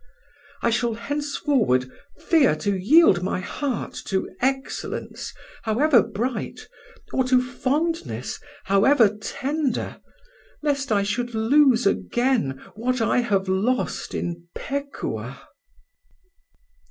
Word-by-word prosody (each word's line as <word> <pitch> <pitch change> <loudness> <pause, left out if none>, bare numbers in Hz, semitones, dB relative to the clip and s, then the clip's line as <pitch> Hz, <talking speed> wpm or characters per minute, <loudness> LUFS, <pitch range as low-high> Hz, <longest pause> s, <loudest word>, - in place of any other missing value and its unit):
I 235 - +3
shall 235 -1 0
henceforward 265 - 0 0.3
fear 320 - +3
to 200 +6 -1
yield 200 - +5
my 185 0 -1
heart 255 +5 -3
to 190 -1 -1
excellence, 270 +2 -3 0.3
however 240 +3 +4
bright, 230 +3 -4 0.5
or 260 - +2
to 255 0 +4
fondness, 295 +7 -2 0.2
however 210 +2 +4
tender, 280 +5 -2 0.6
lest 280 -3 0
I 200 -2 +3
should 235 +4 -2
lose 250 +1 +4
again 240 - +1
what 255 +3 -1
I 225 +2 +2
have 200 -5 0
lost 205 +7 -1
in 170 0 -4
Pekuah." 280 0 -4
245 Hz, 100 wpm, -24 LUFS, 205-280 Hz, 0.6 s, yield